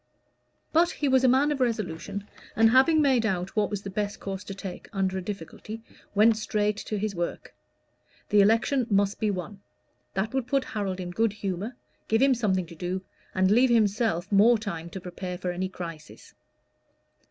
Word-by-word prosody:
But 335 Hz, +2 st, +5 dB
he 295 Hz, -, -2 dB
was 260 Hz, -1 st, +4 dB
a -, -, +6 dB
man 270 Hz, +4 st, +4 dB
of 290 Hz, -, -2 dB
resolution, 205 Hz, -4 st, -2 dB, 0.3 s
who, 225 Hz, +1 st, +6 dB
having 285 Hz, +6 st, +5 dB
made 260 Hz, -5 st, +3 dB
out 190 Hz, -4 st, -2 dB
what 210 Hz, -1 st, +2 dB
was 205 Hz, -2 st, -4 dB
the 195 Hz, -, -6 dB
best 205 Hz, +1 st, -3 dB
course 195 Hz, 0 st, -5 dB
to 195 Hz, -, -6 dB
take 190 Hz, -2 st, -8 dB
under 190 Hz, -3 st, -1 dB
a 190 Hz, -, -2 dB
difficulty, 210 Hz, +4 st, -7 dB, 0.3 s
went 215 Hz, +2 st, +5 dB
straight 210 Hz, -1 st, 0 dB
to 215 Hz, -, -4 dB
his 210 Hz, 0 st, -2 dB
work. 175 Hz, -1 st, -4 dB, 0.8 s
The 210 Hz, -, +5 dB
election 230 Hz, +5 st, +3 dB
must 200 Hz, -1 st, +2 dB
be 215 Hz, -, +1 dB
won: 195 Hz, +1 st, -4 dB, 0.6 s
that 210 Hz, +5 st, -1 dB
would 265 Hz, -2 st, -1 dB
put 275 Hz, +1 st, +1 dB
Harold 195 Hz, -6 st, -3 dB
in 180 Hz, -1 st, -5 dB
good 220 Hz, +3 st, +1 dB
humor, 200 Hz, +3 st, -4 dB, 0.3 s
give 225 Hz, -, +2 dB
him 270 Hz, +1 st, +5 dB
something 195 Hz, -7 st, 0 dB
to 170 Hz, 0 st, -12 dB
do, 180 Hz, +3 st, -3 dB, 0.3 s
and 190 Hz, +1 st, +3 dB
leave 250 Hz, +4 st, +5 dB
himself 215 Hz, -5 st, +1 dB
more 220 Hz, +4 st, +6 dB
time 170 Hz, -6 st, -5 dB
to 190 Hz, -, -7 dB
prepare 180 Hz, 0 st, -6 dB
for 180 Hz, 0 st, -3 dB
any 185 Hz, +1 st, -3 dB
crisis. 165 Hz, -4 st, -9 dB
205 Hz, 185 wpm, -27 LUFS, 185-230 Hz, 0.8 s, a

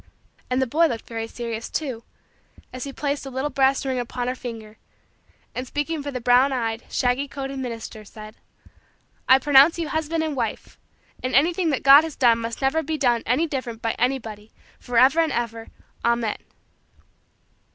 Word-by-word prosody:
And 250 Hz, +1 st, +1 dB
the 265 Hz, -, +2 dB
boy 320 Hz, +7 st, +3 dB
looked 235 Hz, -6 st, -5 dB
very 225 Hz, -1 st, -5 dB
serious, 230 Hz, -1 st, -5 dB
too, 260 Hz, -7 st, -4 dB, 0.7 s
as 255 Hz, +1 st, -5 dB
he 280 Hz, -, -6 dB
placed 285 Hz, +1 st, -3 dB
a 270 Hz, -, -6 dB
little 265 Hz, +3 st, -3 dB
brass 270 Hz, 0 st, +2 dB
ring 260 Hz, -1 st, -1 dB
upon 245 Hz, 0 st, -4 dB
her 250 Hz, -, 0 dB
finger 225 Hz, -4 st, -8 dB, 0.8 s
and, 255 Hz, +1 st, -5 dB
speaking 295 Hz, +3 st, -2 dB
for 285 Hz, -, -5 dB
the 255 Hz, -3 st, -4 dB
brown 250 Hz, +3 st, +4 dB
eyed, 230 Hz, -3 st, -2 dB
shaggy 250 Hz, +3 st, 0 dB
coated, 275 Hz, -1 st, -6 dB
minister, 230 Hz, -3 st, -6 dB
said: 215 Hz, +1 st, -11 dB, 1.0 s
"I 260 Hz, -, +8 dB
pronounce 285 Hz, +4 st, +5 dB
you 330 Hz, -3 st, -3 dB
husband 315 Hz, +1 st, -1 dB
and 310 Hz, -2 st, -2 dB
wife 230 Hz, -4 st, -4 dB, 0.4 s
and 255 Hz, -1 st, -2 dB
anything 335 Hz, +5 st, +3 dB
that 280 Hz, -, -1 dB
God 280 Hz, +3 st, +9 dB
has 320 Hz, -2 st, -6 dB
done 235 Hz, -3 st, +4 dB
must 230 Hz, +3 st, -5 dB
never 270 Hz, +4 st, +2 dB
be 315 Hz, -1 st, -3 dB
done 245 Hz, -5 st, +2 dB
any 260 Hz, +8 st, +2 dB
different 255 Hz, -7 st, -5 dB
by 225 Hz, -, +1 dB
anybody 225 Hz, -4 st, -2 dB, 0.3 s
forever 255 Hz, +6 st, +3 dB
and 325 Hz, -1 st, +2 dB
ever, 230 Hz, -1 st, -3 dB, 0.4 s
Amen." 235 Hz, -2 st, +1 dB
255 Hz, 170 wpm, -23 LUFS, 230-285 Hz, 1.0 s, God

